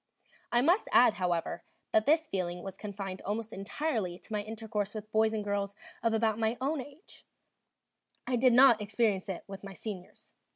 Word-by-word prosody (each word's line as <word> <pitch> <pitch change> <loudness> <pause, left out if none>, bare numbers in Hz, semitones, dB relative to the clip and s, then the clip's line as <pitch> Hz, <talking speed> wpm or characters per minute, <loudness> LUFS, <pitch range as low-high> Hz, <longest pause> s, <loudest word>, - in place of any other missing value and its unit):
I 240 - +4
must 350 - +3
add, 245 -3 +6
however, 175 -3 -1 0.3
that 215 0 +3
this 315 +1 +4
feeling 180 -4 -3
was 195 -1 -6
confined 195 -2 -6
almost 220 +2 -3
entirely 200 - -2
to 220 - -11
my 210 - 0
intercourse 215 -1 -4
with 215 0 -7
boys 220 0 +3
and 215 -1 -2
girls 200 -1 -2 0.3
of 230 - +2
about 220 -1 +1
my 225 +1 +1
own 275 +2 0
age; 290 +8 -14 1.0
I 255 - 0
did 250 0 +4
not 245 -3 +7
experience 205 -2 0
it 185 - -4
with 195 0 -9
my 195 -1 -8
seniors. 190 -1 -8
215 Hz, 175 wpm, -31 LUFS, 195-235 Hz, 1.0 s, not